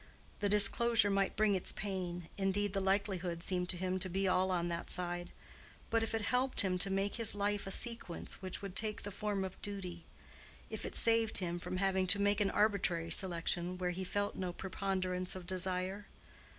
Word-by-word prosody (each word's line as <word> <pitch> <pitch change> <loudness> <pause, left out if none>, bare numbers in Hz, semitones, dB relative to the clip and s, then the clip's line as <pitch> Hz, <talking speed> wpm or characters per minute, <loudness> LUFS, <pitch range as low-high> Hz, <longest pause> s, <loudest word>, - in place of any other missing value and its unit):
The 205 - +1
disclosure 215 +1 +6
might 195 0 +1
bring 215 -1 +3
its 185 - -1
pain, 180 -4 -4
indeed 200 +1 0
the 195 - 0
likelihood 190 -3 0
seemed 180 -1 0
to 180 - 0
him 185 +1 -1
to 185 0 0
be 190 +2 0
all 185 0 +2
on 175 -2 0
that 170 0 -4
side; 175 0 -2 0.6
but 230 0 +3
if 225 0 -1
it 220 - -1
helped 255 +4 +2
him 185 -3 0
to 195 - +1
make 195 +2 -1
his 230 -3 +2
life 205 0 -1
a - - -3
sequence 215 -5 -1
which 185 +1 -5
would 195 -2 -6
take 215 -1 +2
the 205 - -5
form 200 0 -2
of 190 - -9
duty—if 180 -4 -8
it - - -7
saved 225 -1 +3
him 175 -2 -1
from 185 - -4
having 190 -1 +1
to 200 +3 +6
make 205 0 +2
an 200 - +3
arbitrary 190 -6 +1
selection 175 0 0
where 180 -1 -1
he 185 +2 -4
felt 205 +2 -1
no 185 -1 -3
preponderance 185 -1 -2
of 185 -2 -7
desire? 185 +2 -2
190 Hz, 190 wpm, -34 LUFS, 180-205 Hz, 0.6 s, disclosure